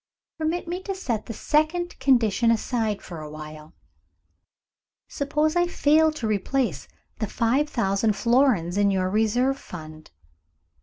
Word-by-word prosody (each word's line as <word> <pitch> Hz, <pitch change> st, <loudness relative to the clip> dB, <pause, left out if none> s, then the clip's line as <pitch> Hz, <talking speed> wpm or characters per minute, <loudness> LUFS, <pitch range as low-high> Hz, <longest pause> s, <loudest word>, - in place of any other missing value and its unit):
"Permit 325 Hz, +2 st, -2 dB
me 355 Hz, +2 st, -3 dB
to 390 Hz, 0 st, -4 dB
set 240 Hz, -, -3 dB
the 230 Hz, -, -5 dB
second 315 Hz, -, 0 dB
condition 235 Hz, -4 st, +3 dB
aside 225 Hz, -2 st, 0 dB
for 170 Hz, -3 st, -8 dB
awhile. 155 Hz, +1 st, -10 dB, 1.3 s
Suppose 300 Hz, +3 st, -1 dB
I 350 Hz, 0 st, +3 dB
fail 315 Hz, -1 st, +3 dB
to 285 Hz, -7 st, -5 dB
replace 215 Hz, -, -1 dB, 0.3 s
the 215 Hz, -, -1 dB
five 255 Hz, +9 st, +1 dB
thousand 210 Hz, -3 st, +1 dB
florins 235 Hz, -8 st, +2 dB
in 200 Hz, 0 st, +4 dB
your 185 Hz, -1 st, 0 dB
reserve 245 Hz, +6 st, +1 dB
fund?" 155 Hz, -2 st, -10 dB
230 Hz, 125 wpm, -24 LUFS, 195-300 Hz, 1.3 s, in